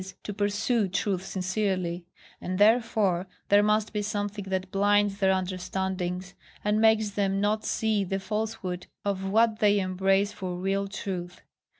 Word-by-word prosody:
to 205 - -5
pursue 205 +2 +1
truth 190 0 -1
sincerely; 185 -2 -2 0.3
and 185 0 -3
therefore 205 -4 +3 0.2
there 205 0 +6
must 210 +1 +1
be 210 - 0
something 205 -1 -3
that 190 -1 -3
blinds 205 0 +2
their 190 -1 +4
understandings, 185 0 -2 0.3
and 210 +1 +2
makes 220 -1 +4
them 195 -1 0
not 210 +2 +1
see 215 -2 0
the 195 +1 -2
falsehood 210 -3 -3 0.2
of 195 -1 -1
what 220 +1 +3
they 205 -1 +4
embrace 195 +2 +1
for 185 -3 -5
real 195 +2 -1
truth. 185 -3 -5
195 Hz, 140 wpm, -27 LUFS, 185-210 Hz, 0.3 s, there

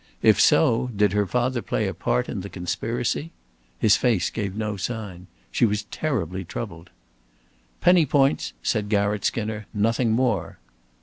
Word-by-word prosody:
If - - +5
so, 125 -4 +4
did 105 -1 +2
her 105 -1 +1
father 125 +3 0
play - - -1
a - - -3
part 60 - -1
in - - -4
the 100 - -7
conspiracy? 115 - -2 0.5
His 105 - +4
face 110 -9 +1
gave 100 -4 -3
no 105 -1 -2
sign. 100 -3 -5 0.2
She - - 0
was 105 -2 +2
terribly 95 - -2
troubled. 85 -2 -7 0.9
"Penny 175 -3 +5
points," 135 - +2
said 105 -1 0
Garratt 100 -1 +1
Skinner. 110 -1 -2
"Nothing 115 +3 +1
more." 115 -6 0
105 Hz, 145 wpm, -24 LUFS, 100-120 Hz, 0.9 s, If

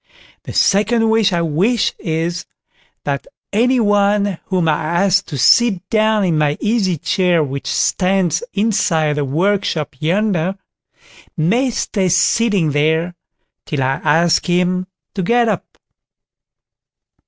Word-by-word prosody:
The - - -7
second 220 +3 +2
wish 220 -3 +2
I 170 -1 0
wish 190 +9 0
is, 165 +1 -3 0.6
that 140 -1 -3 0.3
any 250 +4 +2
one 205 -3 +1
whom 180 -3 0
I - - +4
ask 185 +4 +1
to 145 - -6
sit 195 - +3
down 215 -1 +2
in 165 -4 +1
my 150 -1 +1
easy 210 -5 0
chair 175 +1 +1
which 140 -1 -5
stands 185 - 0
inside 185 -8 0
the 145 - 0
workshop 165 0 -1
yonder, 185 +1 0 0.8
may 225 +12 +1
stay 195 -5 -1
sitting 190 -2 +2
there 160 +4 0 0.5
till 145 -3 -2
I 135 +1 -1
ask 165 +2 +2
him 180 +1 0 0.3
to 200 - -3
get 235 +6 +2
up. 220 - -4
185 Hz, 125 wpm, -17 LUFS, 160-210 Hz, 0.8 s, I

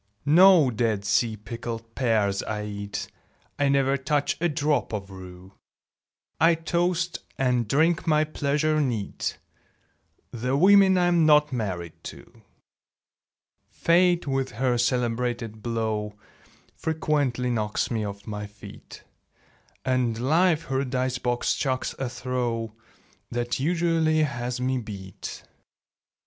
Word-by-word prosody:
No 165 -2 +6
Dead 110 -3 -1
Sea 110 +2 +1
pickled 115 +1 -7
pears 110 -6 +1
I 105 -1 -4
eat; 100 -1 -5 0.5
I 145 -1 +3
never 140 0 +2
touch 145 +2 0
a 175 - +2
drop 145 -5 0
of 100 -2 -5
rue; 95 0 -11 0.9
I 165 +1 +5
toast, 170 +1 -1 0.2
and 125 -3 +1
drink 165 +8 +2
my 155 -1 +4
pleasure 155 0 0
neat, 115 -8 -2 0.9
The 125 +3 -1
women 190 +2 +6
I'm 175 -3 +3
not 150 -2 +5
married 90 -8 -4
to! - - -11 1.3
Fate 175 +1 +2
with 135 -2 -2
her 125 +2 +1
celebrated 120 -3 -1
blow 110 -2 -2 0.6
Frequently 145 -6 -1
knocks 110 -2 -1
me 110 -2 -1
off 100 -1 -6
my 105 -1 -5
feet; 105 +1 -13 0.8
And 125 -3 +1
Life 160 +5 +2
her 135 0 -1
dice 130 -1 -2
box 120 -1 0
chucks 130 -2 -2
a 135 -2 -2
throw 120 -3 -3 0.6
That 120 +1 -2
usually 165 0 +2
has 125 -3 -3
me 130 0 0
beat. 100 -5 -8
125 Hz, 115 wpm, -25 LUFS, 110-150 Hz, 1.3 s, No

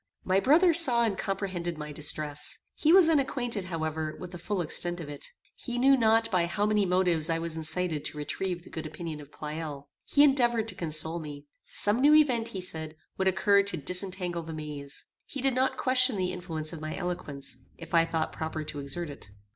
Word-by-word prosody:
My 190 +1 +2
brother 330 - +5
saw 255 -8 +7
and 220 -4 0
comprehended 185 -4 -3
my 150 0 -6
distress. 150 0 -4 0.2
He 310 - +2
was 365 -2 +7
unacquainted, 255 - 0
however, 160 -3 -3
with 180 -1 -8
the 175 - -8
full 200 +3 -3
extent 175 +1 0
of 155 -4 -7
it. 145 -1 -7 0.3
He 245 -1 -5
knew 270 +2 +5
not 225 -2 +3
by 175 -3 +2
how 205 +4 -1
many 210 -2 +2
motives 180 -3 +1
I 165 - +1
was 165 -1 -4
incited 160 -1 0
to - - -3
retrieve 175 +4 -3
the - - -14
good 160 -1 -5
opinion 155 0 -7
of 145 0 -14
Pleyel. 150 -2 -6 0.2
He 285 - +4
endeavored 240 -6 +3
to - - 0
console 160 -1 -1
me. 145 -2 -8 0.2
Some 210 +4 +3
new 295 +2 +6
event, 250 -7 +3
he 195 -5 -5
said, 160 -3 -4 0.2
would 190 - +1
occur 200 +2 +4
to 200 -3 -3
disentangle 180 +2 -2
the 160 -1 -7
maze. 150 -2 -6 0.2
He 280 - -7
did 270 0 +1
not 260 +1 +1
question 255 -1 +3
the 185 -1 -1
influence 165 -3 -5
of 160 - -8
my 155 0 -5
eloquence, 150 -8 -5 0.2
if 165 0 -11
I 165 -1 +5
thought 165 -1 -2
proper 160 0 -4
to 150 -1 -5
exert 145 +3 -3
it. 140 - -10
175 Hz, 205 wpm, -28 LUFS, 155-220 Hz, 0.3 s, saw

